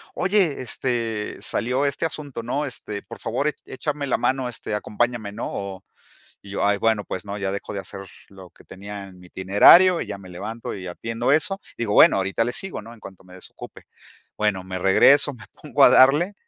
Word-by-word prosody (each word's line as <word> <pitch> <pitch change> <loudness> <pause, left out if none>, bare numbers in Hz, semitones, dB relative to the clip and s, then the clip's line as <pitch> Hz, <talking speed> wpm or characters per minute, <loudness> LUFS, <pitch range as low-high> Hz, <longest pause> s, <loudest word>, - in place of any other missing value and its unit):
"Oye, 185 -7 +1
este, 115 -3 -2
salió 125 +4 0
este 140 +4 0
asunto, 145 -6 -6
¿no?, 135 +6 -2
este 105 -6 -6
por - - -11
favor 125 +6 -2
e - - -5
échame 145 +1 -4
la 130 - +1
mano, 130 -1 -1
este 115 -2 -5
acompáñame, 110 0 -2
¿no?", 105 - -6
o 95 -1 -6 0.6
y 100 - -12
yo, - - -2 0.2
bueno 110 -2 +1
pues, 95 +2 -6
¿no?, 100 0 -5
ya 100 -2 -3
dejo 100 +1 -6
de 100 - -3
hacer 95 0 -7 0.3
lo 95 -2 -13
que - - -21
tenía 100 +1 -9
en 90 -1 -16
mi 90 - -15
itinerario 105 - +6
y - - -4
ya - - -6
me 95 -2 -13
levanto 110 +6 -6
y 95 -2 -8
atiendo 115 +8 -2
eso, 195 +6 +2 0.2
digo: 110 -3 -2
"Bueno - - +6
ahorita 95 +3 0
le 120 - -2
sigo, 195 - 0
¿no?, 115 +3 -12
en 115 - -19
cuanto 95 -2 -13
me 90 0 -16
desocupe", 95 - -11 0.6
bueno 105 -3 0
me 95 0 -5
regreso, 135 +10 +4
me 115 - -14
pongo 145 -2 +2
a - - +8
darle 145 +10 +5
115 Hz, 205 wpm, -23 LUFS, 100-135 Hz, 0.6 s, a